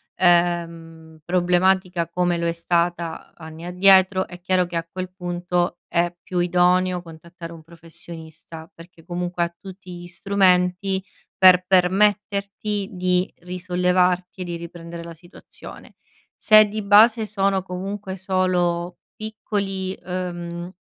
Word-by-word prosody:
ehm, 170 Hz, -2 st, 0 dB
problematica 180 Hz, 0 st, +1 dB
come 175 Hz, 0 st, 0 dB
lo 170 Hz, -, -2 dB
è -, -, +1 dB
stata 170 Hz, 0 st, -2 dB
anni 160 Hz, 0 st, -11 dB
addietro, 185 Hz, +1 st, +4 dB
è 180 Hz, -1 st, -12 dB
chiaro 185 Hz, 0 st, +1 dB
che, 175 Hz, 0 st, -8 dB
a 165 Hz, 0 st, -2 dB
quel 185 Hz, 0 st, -5 dB
punto, 175 Hz, -1 st, -2 dB
è 170 Hz, 0 st, 0 dB
più 180 Hz, -, -3 dB
idoneo 180 Hz, +1 st, +2 dB
contattare 170 Hz, 0 st, -11 dB
un 165 Hz, -1 st, -13 dB
professionista 165 Hz, -1 st, -12 dB
perché, 165 Hz, -1 st, -16 dB
comunque, 175 Hz, 0 st, -2 dB
ha 170 Hz, 0 st, -4 dB
tutti 190 Hz, -2 st, -11 dB
gli 175 Hz, -, -10 dB
strumenti 185 Hz, 0 st, +1 dB, 0.4 s
per 185 Hz, -1 st, +7 dB
permetterti 200 Hz, +2 st, +1 dB
di 180 Hz, -1 st, 0 dB
risollevarti 180 Hz, +1 st, 0 dB
e -, -, -1 dB
di 175 Hz, -1 st, -5 dB
riprendere 170 Hz, 0 st, -9 dB
la 170 Hz, 0 st, -9 dB
situazione. 175 Hz, +3 st, -14 dB, 0.5 s
Se 215 Hz, -1 st, +7 dB
di 215 Hz, +1 st, -4 dB
base, 215 Hz, +3 st, +5 dB
sono 195 Hz, -2 st, 0 dB
comunque 190 Hz, +1 st, -6 dB
solo 180 Hz, -2 st, -1 dB, 0.2 s
piccoli, 200 Hz, -3 st, -4 dB
uhm, 175 Hz, -1 st, -5 dB
180 Hz, 125 wpm, -22 LUFS, 170-190 Hz, 0.5 s, per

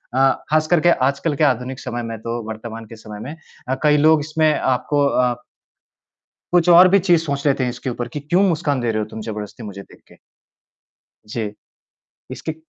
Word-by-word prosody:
अ, 135 Hz, 0 st, +4 dB, 0.2 s
खास 155 Hz, 0 st, +2 dB
करके 175 Hz, 0 st, +3 dB, 0.2 s
आजकल 145 Hz, +2 st, -3 dB
के 155 Hz, -, 0 dB
आधुनिक 130 Hz, -1 st, 0 dB
समय 120 Hz, -2 st, -5 dB
में 115 Hz, -1 st, -5 dB
तो 115 Hz, +1 st, -4 dB
वर्तमान 110 Hz, +1 st, -7 dB
के 115 Hz, -, -12 dB
समय 105 Hz, -1 st, -10 dB
में 145 Hz, +8 st, -7 dB, 0.3 s
अ, 130 Hz, -, +1 dB
कई 150 Hz, 0 st, +4 dB
लोग 155 Hz, +1 st, +5 dB
इसमें 155 Hz, +1 st, +1 dB
आपको 140 Hz, +3 st, +1 dB, 0.2 s
आप 120 Hz, -, -6 dB, 1.1 s
कुछ 175 Hz, -1 st, +3 dB
और 175 Hz, +2 st, +8 dB
भी 195 Hz, +2 st, +4 dB
चीज़ 170 Hz, -3 st, +4 dB
सोच 140 Hz, -2 st, -3 dB
लेते 135 Hz, -2 st, +2 dB
हैं 125 Hz, -, 0 dB
इसके 120 Hz, +2 st, -5 dB
ऊपर 120 Hz, 0 st, -4 dB
कि 145 Hz, +5 st, -6 dB
क्यों 175 Hz, +7 st, +1 dB
मुस्कान 150 Hz, -4 st, 0 dB
दे 120 Hz, -1 st, 0 dB
रहे 110 Hz, -, -1 dB
हो -, -, -5 dB
तुम 110 Hz, -, -7 dB
जबरदस्ती 105 Hz, +1 st, -7 dB
मुझे 100 Hz, -2 st, -8 dB
देख -, -, -18 dB
के। -, -, -18 dB, 1.1 s
जी। 105 Hz, -2 st, -4 dB, 0.8 s
इसके 160 Hz, -, -5 dB
135 Hz, 195 wpm, -20 LUFS, 115-155 Hz, 1.1 s, और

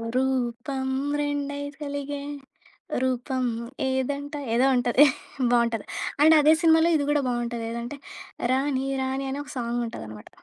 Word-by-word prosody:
రూపం 265 Hz, +1 st, -1 dB, 0.3 s
రెండై 285 Hz, -1 st, -2 dB, 0.2 s
కలిగే 285 Hz, -1 st, -4 dB, 0.8 s
రూపం 260 Hz, 0 st, -1 dB, 0.5 s
ఏదంట 280 Hz, +2 st, -2 dB, 0.2 s
ఏదో 245 Hz, +3 st, +4 dB
ఉంటది. 245 Hz, +3 st, +5 dB, 0.5 s
బావుంటది. 235 Hz, -3 st, +2 dB, 0.4 s
అండ్, 315 Hz, +2 st, +8 dB
అదే 305 Hz, +2 st, +6 dB
సినిమాలో 325 Hz, 0 st, +5 dB
ఇది 285 Hz, -2 st, +1 dB
కూడా 295 Hz, 0 st, +3 dB
బావుంటది. 240 Hz, -1 st, -2 dB
ఏదంటే 235 Hz, +4 st, -5 dB, 0.6 s
రాణి 270 Hz, 0 st, 0 dB, 0.2 s
రాణి 265 Hz, +1 st, -2 dB
అని 280 Hz, -, -3 dB
ఒక -, -, -11 dB
సాంగ్ 240 Hz, 0 st, -1 dB
ఉంటదన్నమాట. 110 Hz, -, -9 dB
265 Hz, 120 wpm, -26 LUFS, 240-285 Hz, 0.8 s, అండ్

